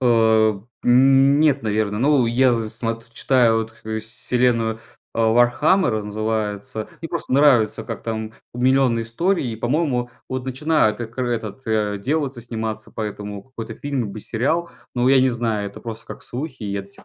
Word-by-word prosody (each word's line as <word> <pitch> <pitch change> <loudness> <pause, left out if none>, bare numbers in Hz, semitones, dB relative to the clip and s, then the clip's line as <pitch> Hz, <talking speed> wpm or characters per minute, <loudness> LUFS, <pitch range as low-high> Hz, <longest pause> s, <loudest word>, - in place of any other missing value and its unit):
А, 110 -4 +3 0.2
нет, 135 +3 +5
наверное. 105 -1 0
Ну, 140 -2 +4
я 125 +2 +3
зн 115 -2 -1
смот 115 +1 -5
читаю, 120 -2 +3
вот, 110 0 -4 0.3
вселенную, 115 0 0 0.3
а, 115 -1 +2
"Вархаммер" 120 - +3
называется. 105 0 -3
Мне 165 - -5
просто 170 -5 -3
нравится, 130 -6 +4
как - - -6
там, 110 -1 -4 0.2
у, - - -7
миллионные 130 -2 +3
истории, 165 - 0
и, - - -6
по-моему, 125 0 0 0.2
вот 130 -1 -3
начинают 135 -3 +1
экр 120 +2 -3
этот, 115 0 -3
а, 105 -2 0
делаться, 135 +2 -2
сниматься 110 -2 -5
по 110 - -5
этому 105 -1 -5
какой-то 125 -4 -8
фильм 145 -2 -3
либо 105 +1 -6
сериал. 160 +12 -1 0.2
Но 125 0 +2
я 135 0 +6
не 130 - +4
знаю, 115 -4 -1
это 100 - -12
просто 115 -1 -8
как - - -9
слухи, 130 0 -6
и 100 - -3
я 100 0 -2
до 100 - -16
сих - - -15
115 Hz, 170 wpm, -21 LUFS, 110-130 Hz, 0.3 s, я